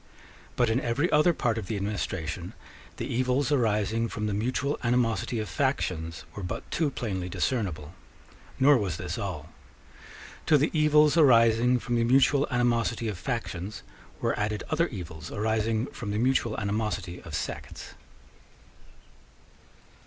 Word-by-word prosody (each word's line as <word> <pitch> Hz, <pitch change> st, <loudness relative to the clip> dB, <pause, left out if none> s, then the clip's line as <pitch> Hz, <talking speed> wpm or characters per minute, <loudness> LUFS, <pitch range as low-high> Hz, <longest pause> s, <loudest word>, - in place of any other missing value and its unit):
But 120 Hz, -2 st, +2 dB
in 120 Hz, +4 st, +1 dB
every 135 Hz, +9 st, 0 dB
other 155 Hz, +4 st, +5 dB
part 120 Hz, -8 st, 0 dB
of 100 Hz, -, -7 dB
the 110 Hz, -, -2 dB
administration 95 Hz, -4 st, -3 dB, 0.4 s
the -, -, -3 dB
evils 130 Hz, +3 st, 0 dB
arising 115 Hz, -3 st, +1 dB
from 105 Hz, -, -4 dB
the 105 Hz, -, -1 dB
mutual 130 Hz, +7 st, -1 dB
animosity 120 Hz, -1 st, +1 dB
of 110 Hz, -1 st, -2 dB
factions 90 Hz, -, -2 dB
were 100 Hz, -, -5 dB
but 90 Hz, -, -5 dB
too 160 Hz, -3 st, +1 dB
plainly 95 Hz, -9 st, -4 dB
discernible. 90 Hz, -, -2 dB, 0.7 s
Nor 140 Hz, 0 st, +6 dB
was 95 Hz, -7 st, -2 dB
this -, -, -4 dB
all. -, -, -5 dB, 1.0 s
To 155 Hz, -, +6 dB
the 150 Hz, +3 st, +1 dB
evils 150 Hz, 0 st, +4 dB
arising 120 Hz, -3 st, +5 dB
from 120 Hz, 0 st, -2 dB
the 115 Hz, -, +2 dB
mutual 135 Hz, +3 st, +4 dB
animosity 120 Hz, -2 st, +1 dB
of 100 Hz, -5 st, -5 dB
factions 105 Hz, -4 st, -4 dB, 0.4 s
were -, -, 0 dB
added 105 Hz, 0 st, -1 dB
other 165 Hz, +2 st, +2 dB
evils 85 Hz, -, -8 dB
arising 110 Hz, +1 st, 0 dB
from 110 Hz, -6 st, -6 dB
the 105 Hz, -, -1 dB
mutual 120 Hz, -2 st, +1 dB
animosity 105 Hz, -4 st, -2 dB
of 85 Hz, -4 st, -7 dB
sects. -, -, -6 dB
115 Hz, 140 wpm, -27 LUFS, 100-130 Hz, 1.0 s, Nor